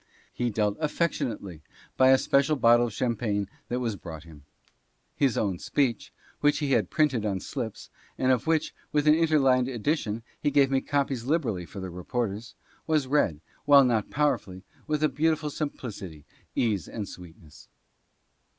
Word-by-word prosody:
He 120 0 -1
dealt 105 -2 0
affectionately 120 - -2 0.3
by 130 0 +5
a 130 - +7
special 140 +3 +2
bottle 120 -2 +5
of 115 - -8
champagne 105 -3 -1 0.2
that 125 - -1
was 115 -4 -2
brought 80 -4 -9
him. 75 -4 -15 0.7
His 135 -5 +1
own 95 -4 -1
speech 130 -6 -1 0.3
(which 145 0 +3
he 145 -3 -1
had - - +5
had - - -30
printed 140 -8 +1
on 100 -3 -1
slips, - - -6 0.3
and 130 0 +2
of 130 +4 0
which, 160 -1 +1 0.2
with 150 -1 +1
an 150 - +8
inter 160 -1 +3
lined 130 -3 +3
addition, 115 -3 -2 0.2
he - - +2
gave 140 -1 +3
me 135 -1 +2
copies 135 -4 -1
liberally 125 - -1
for 75 - -9
the 95 -1 -6
reporters) 105 +4 -4 0.3
was 155 -4 +2
read, 130 - +1 0.2
while 140 -1 +8
not 115 -4 +1
powerfully, 100 -11 -1 0.2
with 155 0 0
a - - +6
beautiful 150 +2 0
simplicity, 105 - -6 0.3
ease 105 -5 0
and 105 -3 -5
sweetness. 85 -4 -13
125 Hz, 165 wpm, -27 LUFS, 100-145 Hz, 0.7 s, an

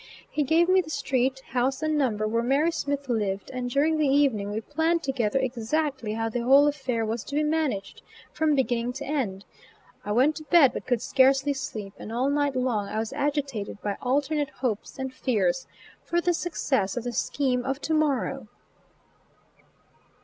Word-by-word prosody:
He 300 - 0
gave 320 +4 +3
me 375 0 +5
the 320 - -11
street, 265 -3 0
house 260 +3 0
and 310 0 +1
number 220 -7 +1
where 230 +2 0
Mary 275 +7 +2
Smith 285 -3 -3
lived 205 -5 -2
and 250 -1 -3
during 305 +5 +2
the 300 - +3
evening 270 -8 +2
we 210 +1 -2
planned 320 +7 0
together 260 -5 0
exactly 260 -1 -1
how 225 +1 -1
the 225 +2 -2
whole 270 +4 +6
affair 260 -6 -1
was 225 +1 -3
to 285 - -6
be 305 - +2
managed, 300 -10 -1 0.3
from 310 -2 +2
beginning 245 -2 0
to 265 - -6
end. 225 -10 -2 0.6
I 205 - -4
went 265 +8 +3
to 310 - -7
bed, 300 -5 +5
but - - -6
could 245 -3 0
scarcely 270 +1 +3
sleep; 215 -7 -6
and 215 - -8
all 255 +4 +1
night 285 -1 +1
long 245 -6 0
I - - -4
was 220 0 -2
agitated 275 -9 -2
by 205 -1 -1
alternate 290 +3 0
hopes 250 -6 -4
and 265 -1 -4
fears 220 -3 0 0.4
for 345 - 0
the 350 0 +1
success 265 - -1
of 240 - -2
the 245 0 -4
scheme 255 0 0
of 270 +1 -2
to 315 - -1
morrow. 270 -6 0
265 Hz, 180 wpm, -26 LUFS, 230-290 Hz, 0.6 s, whole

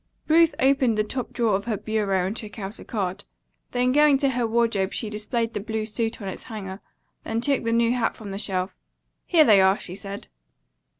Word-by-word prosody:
Ruth 330 +1 +5
opened 265 -4 +3
the 215 - +3
top 250 +4 -4
drawer 225 -4 +1
of 200 - -3
her 225 -3 -1
bureau 205 -3 0
and 195 +4 -3
took 215 -3 -7
out 200 +2 -6
a - - -9
card. 200 -3 -3 0.5
Then 250 0 +1
going 295 0 +5
to 275 0 +1
her 240 -2 0
wardrobe 225 -4 +1
she 215 -3 -3
displayed 225 +2 -2
the - - -2
blue 220 +1 -3
suit 225 +1 -2
on - - -5
its 190 - -7
hanger, 195 -3 -7 0.4
then 225 0 -2
took 275 +3 +1
the 230 - 0
new 230 +1 +3
hat 240 -2 0
from 210 -3 -8
the 195 - -4
shelf. 185 -2 -2 0.5
"Here 330 -3 +6
they 205 -5 +6
are," 190 +1 +4
she 180 - -5
said. 200 +1 -7
220 Hz, 215 wpm, -24 LUFS, 200-240 Hz, 0.5 s, Here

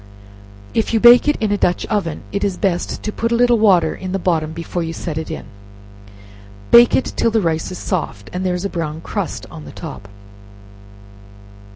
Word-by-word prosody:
If 225 +1 0
you - - +4
bake 240 +4 +7
it 295 - +3
in 215 -2 -1
a 205 - 0
dutch 180 - +1
oven, 190 -8 -2
it 200 - -2
is 195 -3 -1
best 180 -3 -2
to 215 - -2
put 230 +2 -2
a - - +3
little 240 -1 +3
water 180 -7 +4
in 185 0 -6
the - - +1
bottom 165 -4 0
before 170 +2 -4
you 165 0 -3
set 165 -1 -5
it 160 0 -4
in; - - -6 1.3
bake 235 0 +7
it 265 - -1
till - - +2
the 225 0 +1
rice 165 -4 -1
is 185 - -6
soft, 115 - -4
and 180 +1 -3
there 180 -1 0
is 180 +2 -4
a - - +2
brown 160 -4 -4
crust 165 - -4
on 75 -2 -10
the 75 - -9
top. 100 - -9
185 Hz, 205 wpm, -19 LUFS, 165-215 Hz, 1.3 s, bake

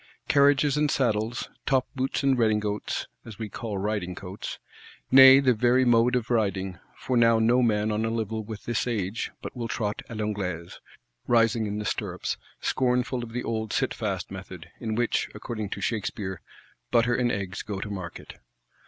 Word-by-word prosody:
Carriages 140 0 +4
and 150 0 +2
saddles; 115 -3 0 0.2
top 130 -2 +2
boots 135 +1 -1
and 135 -1 +4
rédingotes, 105 -3 0 0.2
as 110 -3 -10
we 110 -2 -5
call 105 0 -5
riding 95 -3 -2
coats. 95 +1 -7 0.5
Nay 135 +1 +10
the 130 -2 +4
very 125 +3 +3
mode 120 +1 +4
of 125 -1 -1
riding: 95 -5 0 0.2
for 130 - -2
now 115 -1 +5
no 120 +3 +4
man 110 -2 +2
on 105 +1 0
a 115 - 0
level 110 -1 -2
with 105 -1 -8
his 120 +1 -1
age 110 -2 -2
but - - -7
will 120 -2 -3
trot 105 -3 -2
à 115 - -6
l'Anglaise, 95 -6 -3 0.5
rising 115 -1 +3
in 105 0 -3
the 105 - -4
stirrups; - - -2 0.2
scornful 125 0 0
of 115 - -8
the 125 +1 -3
old 110 -2 -2
sitfast - - -2
method, - - -9
in 110 -1 -3
which, 120 0 0
according 105 -1 -5
to - - -5
Shakspeare, 100 -4 -3 0.5
"butter 120 0 +3
and 120 0 +1
eggs" 100 -1 -3
go 100 -2 -5
to 105 +1 -5
market. 90 -4 -7
115 Hz, 170 wpm, -26 LUFS, 105-120 Hz, 0.5 s, Nay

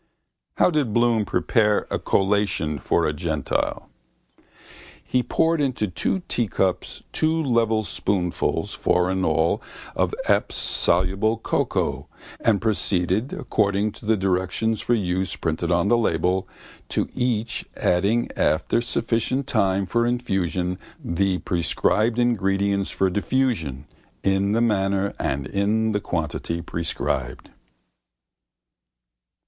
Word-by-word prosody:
How - - +4
did 145 -9 0
Bloom 120 -2 +3
prepare 105 +4 +2
a - - 0
collation 95 -7 +1
for 85 +6 +1
a 75 - 0
gentile? 80 -2 -2 1.2
He 125 - +1
poured 160 +6 +1
into 130 -6 0
two 140 - -2
teacups 95 -5 -1
two 160 +1 +1
level 115 -4 +2
spoonfuls, 90 -4 -1
four 90 +1 +1
in 95 0 -1
all, 80 0 +2 0.3
of - - 0
Epps's - - +1
soluble 95 +6 +2
cocoa 115 - -1 0.3
and 110 -4 +2
proceeded 105 +1 0
according 100 0 0
to 105 - -12
the 110 0 +3
directions 95 +4 0
for 120 - +2
use 95 -3 -1
printed 85 +1 -2
on 85 +3 +2
the 120 - +5
label, 90 -1 +1 0.4
to - - 0
each 115 -2 -1
adding 100 +7 +2
after 80 +9 +1
sufficient 120 +3 0
time 95 -6 +1
for 120 +5 +1
infusion 95 -7 -1 0.2
the 95 +2 0
prescribed 100 +7 +1
ingredients 100 -4 +1
for 95 -1 0
diffusion 90 - -1 0.4
in 95 +1 +2
the 115 - +2
manner 100 -3 +1
and 70 +1 -1
in 110 +6 +1
the 105 - 0
quantity 85 -1 -3
prescribed. 80 -7 -3
100 Hz, 115 wpm, -23 LUFS, 90-115 Hz, 1.2 s, the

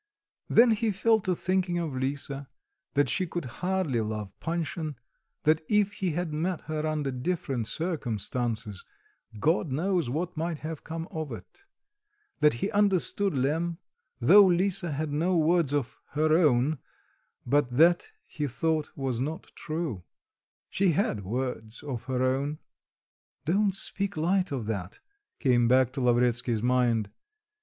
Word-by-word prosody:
Then 235 +1 +6
he 220 +1 +1
fell 220 +3 +3
to 185 -3 -1
thinking 185 0 0
of 165 -6 -2
Lisa, 135 +1 -3 0.5
that 145 +1 +3
she 185 -2 0
could 170 -2 -4 0.2
hardly 180 -10 0
love 105 -2 -4
Panshin, 165 -2 -3 0.5
that 155 +1 +3
if 210 -1 +3
he 185 -5 -2
had 170 -1 -2
met 170 +3 -1
her 155 0 -3
under 150 -3 -1
different 130 -4 -2
circumstances 115 - -2 0.6
God 160 - +1
knows 170 0 0
what 170 +7 -2
might 165 0 -2
have 160 -1 -5
come 165 +1 -5
of 155 -3 -4
it; 395 - -11 0.7
that 150 -4 +4
he - - -2
understood 200 -2 +2
Lemm, 160 +6 0 0.4
though 205 - +8
Lisa 180 -1 +1
had 150 +1 -2
no 170 +5 +1
words 165 -2 +3
of 145 -4 -2
"her 155 +1 +3
own;" 150 -3 +3 0.7
but 140 +1 +2
that, 170 - +4
he 150 -2 -3
thought, 155 +4 -1
was 130 -3 -2
not 155 +4 -4
true; 155 - -4 0.7
she 190 -3 +2
had 125 - 0
words 115 +2 -4
of 130 -6 -5
her 130 -1 -1
own. 135 +3 0 0.9
"Don't 195 +4 +2
speak 200 -1 -2
light 180 +3 +1
of 130 -6 -3
that," 100 -4 -4 0.4
came 120 -4 +3
back 130 0 +4
to 135 - -3
Lavretsky's 120 -2 +2
mind. 120 -4 +2
155 Hz, 140 wpm, -28 LUFS, 125-175 Hz, 0.9 s, though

